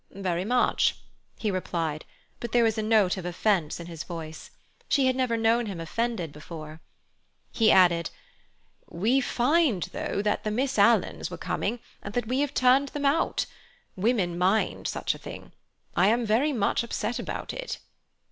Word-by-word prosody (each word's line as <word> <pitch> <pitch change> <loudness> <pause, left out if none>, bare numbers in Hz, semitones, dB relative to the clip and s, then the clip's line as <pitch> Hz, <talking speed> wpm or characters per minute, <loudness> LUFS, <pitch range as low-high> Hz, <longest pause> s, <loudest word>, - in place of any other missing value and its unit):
"Very 185 -2 -2
much," 245 +3 +2 0.4
he 215 - -1
replied, 165 -4 -2 0.3
but 235 - -6
there 240 -1 +5
was 225 -1 +2
a 220 - -1
note 215 -4 +3
of 185 - -6
offence 175 -3 0
in 170 - -7
his 165 -2 -7
voice; 160 -2 -8 0.4
she 275 - +3
had 260 -1 +2
never 255 -3 +1
known 225 +1 +2
him 190 -4 -5
offended 195 0 -2
before. 155 +1 -9 0.7
He 225 -2 +3
added: 175 -4 +5 0.8
"We 230 +10 +2
find, 255 - +2
though, 200 - -2
that 210 - 0
the 215 - -1
Miss 260 +5 0
Alans - - +3
were - - -7
coming, 240 - -2 0.2
and 200 - -8
that 245 - 0
we 255 +3 0
have 290 -1 -1
turned 260 +2 +4
them 290 0 -4
out. 295 +4 +2 0.5
Women 185 -4 0
mind 190 +5 +1
such - - -1
a - - -11
thing. - - -9 0.4
I 180 +2 +4
am 235 +2 +2
very 235 +8 +2
much 220 -7 +1
upset 235 0 -3
about - - -5
it." - - -5
215 Hz, 165 wpm, -27 LUFS, 175-245 Hz, 0.8 s, there